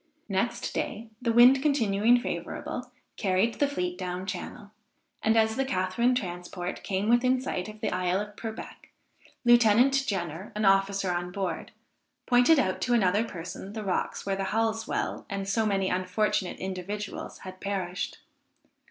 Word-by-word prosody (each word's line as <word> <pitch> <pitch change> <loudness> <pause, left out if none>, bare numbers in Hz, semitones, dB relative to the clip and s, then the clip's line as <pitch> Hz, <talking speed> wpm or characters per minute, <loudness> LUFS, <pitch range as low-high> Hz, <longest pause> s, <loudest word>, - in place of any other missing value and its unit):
Next - - -1
day, 225 +2 -3
the 235 -2 +1
wind 245 +3 +7
continuing 235 -5 +3
favorable, - - -5 0.3
carried 195 +2 +1
the 285 - +4
fleet 180 -10 -3
down 180 0 -4
channel; 190 +2 -6 0.5
and 220 +1 +3
as 220 0 +3
the 270 - +2
Catharine 235 +1 +1
transport 180 -4 -4
came 195 +1 -1
within 250 +2 +4
sight 200 -7 -3
of 215 0 -11
the - - -1
isle 180 +1 +1
of 205 0 -6
Purbeck, 220 0 -8 0.6
Lieutenant 240 +2 +6
Jenner, 175 -1 -3
an 210 0 0
officer 195 -1 +3
on 175 0 -3
board, 195 0 -3 0.5
pointed 245 +6 +5
out 185 -9 +1
to 245 -1 +2
another 205 -1 +3
person, 190 -1 -7
the 220 -1 -4
rocks 190 -3 -2
where 195 -1 0
the 195 0 -2
Halsewell 225 +1 -1
and 195 -1 -3
so 220 +2 +1
many 195 -2 +1
unfortunate 185 +2 0
individuals 190 +2 -5
had 185 0 -9
perished. 190 -3 -3
200 Hz, 150 wpm, -28 LUFS, 185-230 Hz, 0.6 s, wind